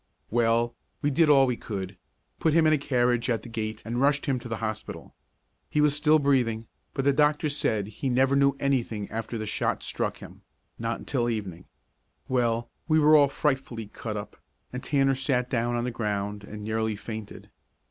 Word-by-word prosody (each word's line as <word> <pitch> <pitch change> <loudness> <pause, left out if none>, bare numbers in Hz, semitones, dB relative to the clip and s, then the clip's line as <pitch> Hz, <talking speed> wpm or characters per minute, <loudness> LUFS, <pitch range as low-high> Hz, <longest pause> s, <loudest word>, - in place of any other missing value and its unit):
Well, 115 0 +2 0.3
we 145 - +2
did 155 +3 +4
all 135 -2 +7
we 125 -2 0
could; 95 -4 -5 0.4
put 160 - +2
him 165 -1 +5
in 155 - +5
a 150 - +2
carriage 125 -3 +1
at 115 -3 0
the - - -9
gate 110 -1 -4
and 120 +2 -2
rushed 140 0 +2
him 130 -2 0
to 120 0 -9
the 115 - -2
hospital. 110 -1 -5 0.6
He 150 - 0
was 150 -1 +4
still 150 +1 +4
breathing, 125 -6 +1 0.3
but 135 -2 -1
the 140 - +4
doctor 150 +1 +2
said 110 -8 0
he 110 +6 -4
never 135 +2 +3
knew 140 0 +4
anything 120 -7 -1
after 115 +1 -4
the 110 - -4
shot 105 - -1
struck - - -2
him - - -12 0.4
not - - -2
until 120 0 -1
evening. 95 -6 -4 0.6
Well, 120 -2 +1 0.2
we 155 -1 +4
were 155 0 +6
all 145 -2 +7
frightfully 135 -5 -1
cut 110 -3 -5
up, 105 - -7 0.4
and 125 - -5
Tanner 135 -2 +2
sat 130 -2 0
down 120 -1 0
on 120 - -1
the 125 - -2
ground 105 -2 -3
and 105 +1 -8
nearly 110 0 -1
fainted. 110 0 -8
120 Hz, 190 wpm, -27 LUFS, 110-140 Hz, 0.6 s, all